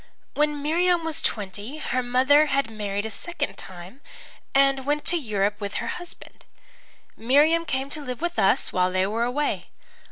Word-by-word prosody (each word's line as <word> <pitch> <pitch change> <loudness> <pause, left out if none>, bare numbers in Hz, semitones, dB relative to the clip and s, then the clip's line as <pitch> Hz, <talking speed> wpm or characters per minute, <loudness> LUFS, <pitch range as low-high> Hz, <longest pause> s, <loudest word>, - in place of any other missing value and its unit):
When 295 -1 0
Miriam 345 +2 +2
was 320 -2 -1
twenty 205 +6 -3
her 255 -4 -1
mother 265 +5 +4
had 275 -4 0
married 205 -1 -3
a 220 - -4
second 315 - -4
time 185 +8 -10 0.5
and 275 -1 +4
went 295 +2 -1
to 350 - +4
Europe 205 - -1
with 200 0 -4
her - - -3
husband. 350 - -12 0.7
Miriam 295 +8 +3
came 265 -1 -2
to 305 - -3
live 250 -4 -5
with 345 +1 -2
us 195 - +2
while 180 0 +2
they 185 0 +1
were 220 +4 -1
away. 285 +5 -2
265 Hz, 165 wpm, -25 LUFS, 210-300 Hz, 0.7 s, mother